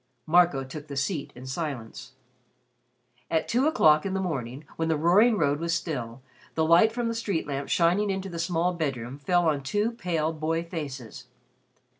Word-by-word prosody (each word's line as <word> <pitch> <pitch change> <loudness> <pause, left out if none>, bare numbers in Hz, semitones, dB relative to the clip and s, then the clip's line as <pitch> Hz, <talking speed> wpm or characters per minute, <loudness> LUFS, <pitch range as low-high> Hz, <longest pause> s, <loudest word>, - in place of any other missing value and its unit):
Marco 170 -4 +4
took 145 +3 -9
the 140 -2 -6
seat 145 +2 -2
in 125 +1 -10
silence. 130 -4 -5 1.2
At 160 -1 0
two 255 +5 +2
o'clock 155 - +5
in 195 -1 -2
the - - 0
morning, 140 -6 -4
when 160 - -1
the 160 -1 +1
roaring 205 +9 +4
road 145 -5 +1
was 165 0 0
still, 125 -6 -4 0.3
the 160 - +2
light 170 +7 +5
from 240 0 -2
the 230 - -1
street 205 -7 -2
lamp, 140 -1 -4
shining 180 +5 +2
into 195 0 -2
the 170 -3 -6
small 170 +1 0
bedroom, 135 -5 -3
fell 175 +3 +2
on 145 -3 +1
two 205 +11 0
pale 170 -8 -1
boy 160 +1 -1
faces. 145 - -7
160 Hz, 175 wpm, -27 LUFS, 140-180 Hz, 1.2 s, o'clock